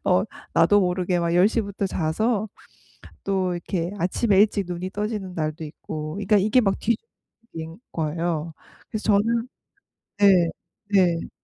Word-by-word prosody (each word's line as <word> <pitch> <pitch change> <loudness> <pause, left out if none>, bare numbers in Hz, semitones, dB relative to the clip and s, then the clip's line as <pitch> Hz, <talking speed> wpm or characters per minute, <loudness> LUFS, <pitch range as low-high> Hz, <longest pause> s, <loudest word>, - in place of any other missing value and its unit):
어 - - +3 0.3
나도 205 0 +5
모르게 180 0 0
막 170 0 0
10 180 +4 +6
시부터 200 -3 -2
자서 205 +6 0 0.8
또 190 -2 0
이렇게 175 0 -3
아침에 195 +3 +2
일찍 205 -2 +3
눈이 180 +1 -4
떠지는 205 -2 -3
날도 155 0 -3
있고 155 0 -6
그러니까 205 +1 +2
이게 210 +6 +3
막 195 -4 0
뒤죽박죽인 220 - -6
거예요. 165 0 -2 0.4
그래서 215 - -4
저는 230 +4 +1 0.7
네 185 -4 +5 0.4
네. 175 -4 +3
185 Hz, 275 characters per minute, -24 LUFS, 170-205 Hz, 0.8 s, 10